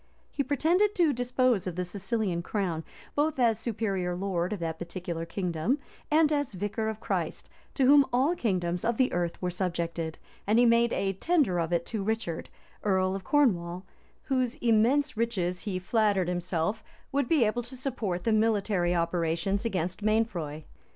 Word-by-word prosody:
He - - -1
pretended 340 - +2
to 335 -5 +3
dispose 245 -4 +1
of 180 - -3
the 180 0 -2
Sicilian 195 -1 -2
crown, 175 -4 -2 0.3
both 300 +1 +1
as 230 -4 +3
superior 200 -6 -2
lord 180 -1 -1
of 210 - -3
that 160 -1 -3
particular 170 -1 -5
kingdom, 180 - -1 0.3
and 305 0 +4
as 285 -6 -1
vicar 205 +4 -2
of 220 0 -5
Christ, - - -3 0.2
to 270 - +3
whom 280 +1 +7
all 270 +8 +2
kingdoms 180 - -1
of 235 -1 0
the 260 -1 +2
earth 175 -1 -1
were 180 - 0
subjected; 170 -3 -2 0.3
and 215 +2 +3
he 245 - +6
made 235 0 +4
a 195 0 0
tender 270 - +1
of 165 0 -1
it 170 -1 +1
to 220 -3 -3
Richard, 200 -5 -2 0.3
earl 190 -2 +2
of 195 - -5
Cornwall, 185 -10 +1 0.4
whose 255 -2 0
immense 245 +2 +2
riches, 185 -6 0
he 195 -2 -3
flattered 200 -1 +1
himself, 180 +3 -1 0.3
would 280 -2 +1
be 295 -6 +4
able 215 +3 0
to 245 +2 -10
support 225 -9 -3
the 225 - +2
military 205 -5 +2
operations 170 +4 0
against 185 -3 -2
Mainfroy. 195 -9 0
205 Hz, 165 wpm, -28 LUFS, 175-240 Hz, 0.4 s, whom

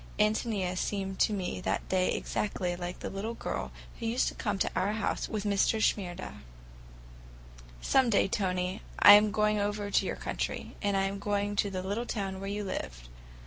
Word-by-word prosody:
Ántonia 210 -3 +1
seemed 195 0 -2
to - - +4
me 185 -3 -3
that - - -2
day 185 -1 +2
exactly 180 -4 -2
like 175 0 -6
the - - -3
little 215 +4 -4
girl - - -4 0.3
who 230 - -3
used 235 +3 +1
to - - -9
come 205 -3 -2
to - - 0
our 195 +3 +1
house 220 - -2
with 215 -2 -2
Mr. 205 +2 +2
Shimerda. 185 -4 -1 1.5
"Some 265 -2 +4
day, 200 -3 +3
Tony, 185 -1 -1 0.2
I 205 - +10
am 210 +1 +7
going 210 0 +2
over 205 0 -2
to - - +3
your - - -2
country, - - -4
and 200 -2 +1
I 195 - +2
am 195 +1 -2
going 205 0 -1
to 200 - +2
the 185 -1 -4
little 210 +5 -2
town 195 -3 -3
where 195 0 -5
you 205 +1 -3
lived. - - -5
200 Hz, 185 wpm, -30 LUFS, 190-210 Hz, 1.5 s, I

